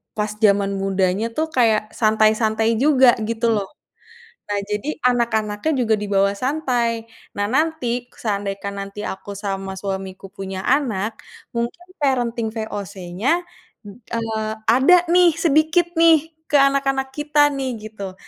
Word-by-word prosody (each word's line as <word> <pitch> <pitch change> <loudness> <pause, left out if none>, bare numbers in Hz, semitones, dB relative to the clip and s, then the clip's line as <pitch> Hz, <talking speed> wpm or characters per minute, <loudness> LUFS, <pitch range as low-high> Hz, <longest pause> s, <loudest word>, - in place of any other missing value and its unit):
pas 210 0 -1
jaman 200 -1 +4
mudanya, 195 +2 0
tuh, 315 +6 -1
kayak 220 -6 +2
santai-santai 220 0 +2
juga 265 -3 +5
gitu, 230 +1 0
loh. 200 -2 -2 0.8
Nah, 205 0 -1
jadi, 210 +9 -3
anak-anaknya 235 +1 +1
juga 225 -2 +2
dibawa 200 -1 +1
santai. 250 -4 0 0.3
Nah, 205 0 0
nanti, 255 -4 -1
seandaikan 200 -1 -3
nanti 200 +1 -7
aku 200 0 -6
sama 195 -1 -4
suamiku 190 -1 -5
punya 190 -1 -6
anak, 230 -6 0 0.4
mungkin 235 +10 -3
parenting 240 -5 0
VOC-nya, 205 - -2 0.7
eee, 220 -2 -2 0.2
ada 265 +10 +6 0.2
nih, 355 -1 +6
sedikit, 330 +2 +2
nih, 325 -1 +5 0.2
ke 295 - +4
anak-anak 275 -1 +2
kita, 295 0 +3
nih, 270 -2 -2 0.2
gitu. 200 -3 -7
225 Hz, 120 wpm, -21 LUFS, 200-275 Hz, 0.8 s, ada